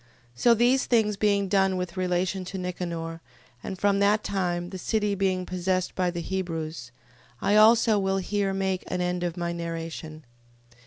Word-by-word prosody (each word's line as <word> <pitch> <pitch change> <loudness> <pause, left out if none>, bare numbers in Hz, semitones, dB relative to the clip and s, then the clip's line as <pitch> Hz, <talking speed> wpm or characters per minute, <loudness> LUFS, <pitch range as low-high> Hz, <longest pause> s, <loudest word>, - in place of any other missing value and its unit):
15:38. - - -12
So 240 - +6
these 245 +4 +3
things 220 -4 +2
being 200 -1 +1
done 190 -1 +2
with 180 -1 -4
relation 185 +1 -1
to 185 +2 -6
Nicanor, 170 -2 -4 0.4
and 190 - -6
from 200 +1 +2
that 205 +1 +3
time 175 -2 -2
the 190 - -6
city 210 +1 0
being 190 -2 0
possessed 185 0 -1
by 180 -1 0
the 175 -1 -4
Hebrews, 165 -8 -4 0.5
I 205 - +2
also 220 0 +6
will 195 0 0
here 195 +1 -1
make 190 -1 -1
an 180 - -2
end 180 0 -1
of 175 0 -3
my 170 0 -2
narration. 165 -2 -6
185 Hz, 170 wpm, -26 LUFS, 175-200 Hz, 0.5 s, So